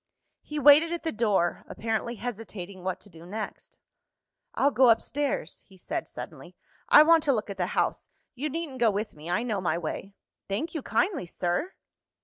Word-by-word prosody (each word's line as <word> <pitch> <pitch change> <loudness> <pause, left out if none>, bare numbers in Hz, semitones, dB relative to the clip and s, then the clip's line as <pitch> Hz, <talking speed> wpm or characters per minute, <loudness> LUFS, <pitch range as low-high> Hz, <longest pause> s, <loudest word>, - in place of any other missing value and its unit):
He 300 - -7
waited 295 +3 +7
at 345 -2 -3
the 325 - -1
door, 205 -6 +1
apparently 225 +2 -2
hesitating 200 -6 -7
what 185 0 -2
to - - -12
do 165 -1 -13
next. 210 +5 -7 0.8
"I'll 280 - +3
go 260 -2 +5
upstairs," 260 - 0
he 190 - -18
said - - -4
suddenly; - - -9 0.3
"I 300 - +9
want 330 +1 +6
to 285 - +4
look 215 -3 -2
at 195 - -7
the 180 -1 0
house. - - 0 0.2
You 290 +5 -3
needn't 300 -3 -5
go 235 -1 +5
with 210 +1 -3
me; 155 +3 -9
I 180 +6 +1
know 215 -5 -1
my 175 -2 0
way." 185 +4 -5 0.3
"Thank 225 +12 -2
you 315 - -3
kindly, 350 - 0
sir!" 175 - -2
225 Hz, 180 wpm, -27 LUFS, 190-290 Hz, 0.8 s, I